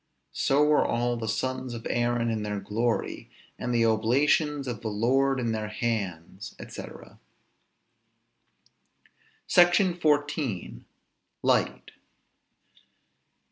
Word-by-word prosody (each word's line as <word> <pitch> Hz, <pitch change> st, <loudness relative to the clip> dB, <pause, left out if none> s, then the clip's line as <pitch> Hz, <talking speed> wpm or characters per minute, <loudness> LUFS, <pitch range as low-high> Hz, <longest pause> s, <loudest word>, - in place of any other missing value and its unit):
So 140 Hz, +2 st, +2 dB
were 150 Hz, 0 st, +4 dB
all 120 Hz, +1 st, 0 dB
the 115 Hz, -1 st, -4 dB
sons 130 Hz, +2 st, -2 dB
of 115 Hz, -, -8 dB
Aaron 120 Hz, -1 st, 0 dB
in 110 Hz, -1 st, -2 dB
their 105 Hz, -1 st, -3 dB
glory, 110 Hz, +4 st, -2 dB, 0.3 s
and 125 Hz, -, -3 dB
the 115 Hz, -1 st, +3 dB
oblations 135 Hz, +6 st, +2 dB
of 120 Hz, -3 st, -4 dB
the 115 Hz, -, -4 dB
Lord 130 Hz, +6 st, +1 dB
in 120 Hz, -2 st, -1 dB
their 110 Hz, -1 st, -2 dB
hands, 105 Hz, -3 st, -4 dB
&c._ -, -, -10 dB, 2.3 s
SECTION 175 Hz, +1 st, +4 dB
XIV. 145 Hz, -, -1 dB, 0.6 s
LIGHT. -, -, +1 dB
120 Hz, 100 wpm, -27 LUFS, 110-135 Hz, 2.3 s, were